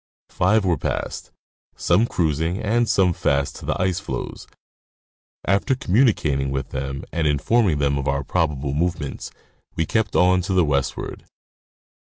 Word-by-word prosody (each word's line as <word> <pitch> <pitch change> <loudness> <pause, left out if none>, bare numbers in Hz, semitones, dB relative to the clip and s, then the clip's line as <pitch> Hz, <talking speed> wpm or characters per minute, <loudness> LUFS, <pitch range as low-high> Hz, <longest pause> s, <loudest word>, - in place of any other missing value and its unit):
Five 105 +3 +2
were 85 -3 +1
passed, - - -3 0.5
some 100 +7 +2
cruising 80 0 0
and 115 +2 +1
some 90 -3 +3
fast 70 -3 0
to - - -10
the - - -1
ice 90 -1 +1
floes. - - -6 1.0
After 100 +8 +2
communicating 90 - +2
with 65 -1 -3
them 70 0 -4
and 80 -2 0
informing 80 - +2
them 70 -1 +1
of 70 - -3
our 70 +1 0
prob 80 +2 0
able 70 0 -4
movements, 80 -2 -2 0.5
we 80 - 0
kept 110 +3 0
on 90 +1 +4
to 95 +2 -2
the 90 -3 +4
westward. 70 -2 -2
85 Hz, 150 wpm, -22 LUFS, 70-95 Hz, 1.0 s, on